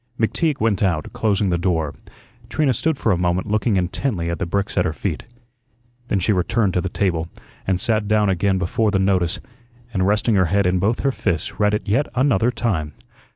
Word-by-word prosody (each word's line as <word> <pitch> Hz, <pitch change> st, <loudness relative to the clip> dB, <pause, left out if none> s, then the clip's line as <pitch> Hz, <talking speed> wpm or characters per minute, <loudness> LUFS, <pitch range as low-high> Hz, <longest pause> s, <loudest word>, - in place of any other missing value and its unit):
McTeague 150 Hz, +7 st, 0 dB
went 110 Hz, -3 st, +1 dB
out, 85 Hz, -6 st, 0 dB
closing 100 Hz, -3 st, +1 dB
the 85 Hz, -, +1 dB
door. 80 Hz, -5 st, 0 dB, 0.6 s
Trina 140 Hz, +2 st, +1 dB
stood 160 Hz, +5 st, 0 dB
for 110 Hz, -, +1 dB
a 90 Hz, -, +2 dB
moment 90 Hz, +1 st, 0 dB
looking 105 Hz, +1 st, +1 dB
intently 90 Hz, -1 st, -1 dB
at 85 Hz, -, -4 dB
the -, -, -2 dB
bricks 100 Hz, +3 st, -2 dB
at 90 Hz, -, +3 dB
her 85 Hz, -3 st, -1 dB
feet. 80 Hz, -2 st, -4 dB, 0.8 s
Then 100 Hz, -, 0 dB
she 95 Hz, +3 st, +2 dB
returned 100 Hz, +2 st, +1 dB
to 90 Hz, -, +1 dB
the 95 Hz, -, -3 dB
table, 85 Hz, -4 st, -1 dB, 0.4 s
and 95 Hz, -1 st, +1 dB
sat 110 Hz, 0 st, 0 dB
down 105 Hz, -1 st, +3 dB
again 95 Hz, +1 st, +1 dB
before 95 Hz, +4 st, 0 dB
the 100 Hz, -, +1 dB
notice, 95 Hz, -3 st, +1 dB, 0.5 s
and, 95 Hz, -2 st, +1 dB
resting 105 Hz, +3 st, +2 dB
her 95 Hz, -2 st, +4 dB
head 100 Hz, +3 st, +1 dB
in 90 Hz, 0 st, +2 dB
both 110 Hz, +6 st, 0 dB
her 135 Hz, -, +2 dB
fists, 100 Hz, -, -3 dB
read 105 Hz, 0 st, +3 dB
it 105 Hz, -, -5 dB
yet 110 Hz, +9 st, +1 dB
another 125 Hz, -4 st, +3 dB
time. 100 Hz, -, -2 dB
100 Hz, 200 wpm, -21 LUFS, 90-110 Hz, 0.8 s, her